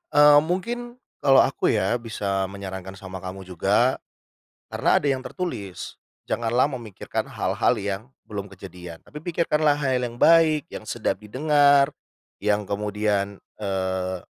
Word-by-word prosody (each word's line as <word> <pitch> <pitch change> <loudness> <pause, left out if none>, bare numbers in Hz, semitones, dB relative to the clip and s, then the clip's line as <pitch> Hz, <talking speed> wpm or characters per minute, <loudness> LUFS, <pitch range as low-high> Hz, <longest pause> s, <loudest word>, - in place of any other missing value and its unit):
Eee, 145 0 +8
mungkin 235 +9 -3 0.2
kalau 135 -1 +6
aku - - 0
ya, 105 +6 +1
bisa 100 -4 -2
menyarankan 95 -1 -7
sama 95 -1 -8
kamu 95 +1 -7
juga, 90 -2 +2 0.8
karena - - +1
ada 145 - +1
yang 130 -1 0
tertulis. 120 - -6 0.3
Janganlah 120 +4 +2
memikirkan 115 -7 -4
hal-hal - - +1
yang 100 +1 -3 0.3
belum 100 -2 -5
kejadian. 90 -3 -10
Tapi 150 - -9
pikirkanlah 155 -3 +1
hal 130 -3 0
yang 120 -1 -4
baik, 160 -3 +5
yang - - -7
sedap - - -1
didengar, 140 +4 +4 0.5
yang 105 0 +1
kemudian, 100 -1 -1 0.2
eee, 95 -2 -2
105 Hz, 130 wpm, -24 LUFS, 95-145 Hz, 0.8 s, Eee